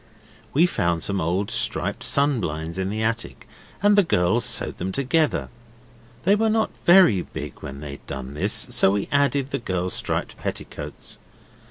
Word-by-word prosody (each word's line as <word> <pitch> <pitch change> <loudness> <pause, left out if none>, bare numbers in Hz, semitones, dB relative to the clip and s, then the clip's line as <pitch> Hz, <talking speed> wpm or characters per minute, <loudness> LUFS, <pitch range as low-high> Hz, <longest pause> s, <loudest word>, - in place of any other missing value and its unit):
We 160 +5 +4
found 85 - 0
some 100 -1 -1
old 90 +5 -1
striped - - -1
sun 140 -2 +3
blinds 80 0 -4
in 95 0 -1
the 110 +2 -2
attic, 115 +1 -3 0.4
and 205 0 +5
the 205 - +7
girls 115 - +1
sewed - - 0
them 95 +2 -3
together. 140 +6 0 0.7
They 195 - +4
were 220 +2 +2
not 220 0 +1 0.2
very 175 - +7
big - - -8
when 70 +1 -7
they 70 -2 -7
were - - -26
done, 70 +3 -3
so - - +2
we 100 -1 -1
added 140 -1 +1
the - - -1
girls' 90 -5 -2
striped - - -2
petticoats. - - -6
110 Hz, 165 wpm, -23 LUFS, 85-145 Hz, 0.7 s, the